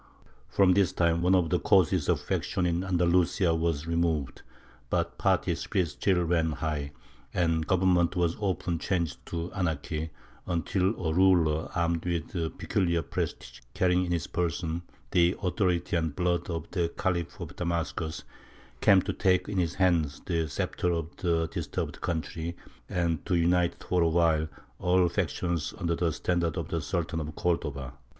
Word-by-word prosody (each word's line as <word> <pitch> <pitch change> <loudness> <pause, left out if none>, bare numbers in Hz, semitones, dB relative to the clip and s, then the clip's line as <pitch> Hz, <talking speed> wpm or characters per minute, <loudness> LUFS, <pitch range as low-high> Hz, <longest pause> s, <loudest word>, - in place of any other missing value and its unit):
From 95 -2 +4
this 95 -1 +3
time 85 -2 +1
one 90 +2 +4
of 85 -3 +2
the 90 - +3
causes 95 -5 +3
of - - +3
faction 90 - -1
in 85 +1 0
Andalusia 90 0 +2
was 80 -2 0
removed, 85 -5 -1 0.5
but - - -1
party - - +2
spirit 90 -3 -1
still 90 +4 +1
ran 80 -2 +1
high, 75 -2 -3 0.4
and 80 -3 +1
government 90 -2 +3
was 85 -2 +1
often 90 -5 -1
changed 85 -8 -2
to 85 +1 -4
anarchy, 80 -3 -2 0.4
until 90 +3 0
a 80 - +1
ruler 85 -4 +3
armed 85 -1 0
with 85 -2 -2 0.3
peculiar 85 -4 0
prestige, - - -4 0.2
carrying 90 0 +3
in 90 - -3
his 85 -2 0
person 85 -1 -2 0.3
the 85 +1 +4
authority 90 -2 0
and 80 -3 -1
blood 90 -1 0
of 80 -2 -3
the 85 -3 0
Khalifs 85 -3 -1
of - - -7
Damascus, 85 -1 -2 0.6
came 95 -2 +6
to - - -2
take 90 -1 +2
into 100 -3 0
his 85 0 -2
hands 85 -6 +2
the 85 -3 0
sceptre 90 +4 -1
of 85 0 -4
the 85 -2 +1
disturbed - - -4
country 85 0 -3 0.3
and 85 -3 0
to 90 - +2
unite 85 +1 +2
for 90 -1 +1
awhile 80 -1 +3 0.3
all 90 0 +3
factions 85 -2 -2
under 85 -1 0
the 85 -1 +1
standard 85 +2 -1
of 80 -2 -3
the 85 -1 -1
Sultan 80 +1 -2
of 75 -1 -5
Cordova. 70 -6 -2
85 Hz, 155 wpm, -28 LUFS, 80-90 Hz, 0.6 s, came